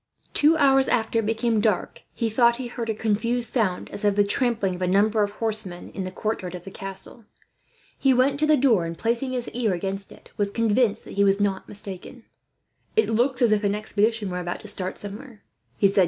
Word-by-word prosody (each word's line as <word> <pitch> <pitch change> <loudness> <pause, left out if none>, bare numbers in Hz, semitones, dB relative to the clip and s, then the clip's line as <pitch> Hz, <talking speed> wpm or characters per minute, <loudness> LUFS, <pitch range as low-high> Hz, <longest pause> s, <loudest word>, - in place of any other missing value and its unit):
Two 310 +2 +5
hours 270 -2 +4
after 230 -1 +1
it 215 - -2
became 225 -1 +1
dark 210 -4 -1
he 230 - -2
thought 235 +1 +3
he 255 +1 -6
heard 240 -1 -5
a 220 - 0
confused 230 +3 -1
sound, 205 -8 0
as 205 - -3
of 205 -1 +2
the 205 - +4
trampling 210 -2 0
of 180 - -8
a 180 - +1
number 210 +4 +3
of 205 - +1
horsemen 215 -5 -2
in 190 - -5
the - - -4
courtyard 185 -3 -3
of 175 - -9
the 195 - -9
castle. 195 +4 -3 0.7
He 270 - +3
went 265 +2 +2
to 305 - +2
the 305 -1 +5
door 230 -10 +3
and, 165 0 -5
placing 235 +6 -1
his 245 -1 -2
ear 230 -5 -1
against 195 +2 -3
it, - - -16
was 205 -1 +1
convinced 225 0 +1
that - - -11
he - - +6
was 195 0 +3
not 200 -2 -1
mistaken. 205 +4 -8 0.7
"That 440 - +2
looks 245 +3 +1
as 230 - +4
if 215 0 +2
an 200 0 +1
expedition 215 -1 0
were 180 - -3
about 175 0 -4
to 215 - -11
start 185 -2 -2
somewhere," 210 +2 -5 0.3
he 200 - +4
said. 195 +1 +1
215 Hz, 220 wpm, -24 LUFS, 200-240 Hz, 0.7 s, he